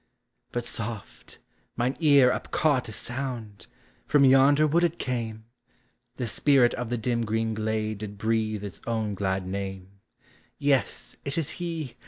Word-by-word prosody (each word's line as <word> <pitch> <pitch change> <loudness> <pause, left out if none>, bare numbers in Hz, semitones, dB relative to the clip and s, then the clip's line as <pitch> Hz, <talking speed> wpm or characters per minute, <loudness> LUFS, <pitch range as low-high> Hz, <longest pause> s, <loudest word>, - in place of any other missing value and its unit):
But 120 -1 -3
soft! 110 -2 -5 0.4
mine 125 +3 0
ear 140 -6 +6
upcaught 145 -2 0
a - - -7
sound, 115 -2 -5 0.2
— - - -34
from 145 -2 +5
yonder 135 +3 +6
wood 165 +3 +2
it 170 0 +1
came! 115 -4 -3 0.7
The 125 - -3
spirit 125 +1 +3
of 120 -2 -4
the 120 - -1
dim 115 +1 0
green 110 0 -1
glade 110 -1 -2
did 105 -1 -7
breathe 110 -1 0
his 100 -2 -8
own 110 -3 -1
glad 95 -1 -1
name; 95 0 -6 0.3
— 125 - -29 0.2
Yes, 140 -2 0
it 140 +2 -4
is 160 -2 0
he! 165 -6 -5
115 Hz, 155 wpm, -27 LUFS, 110-140 Hz, 0.7 s, ear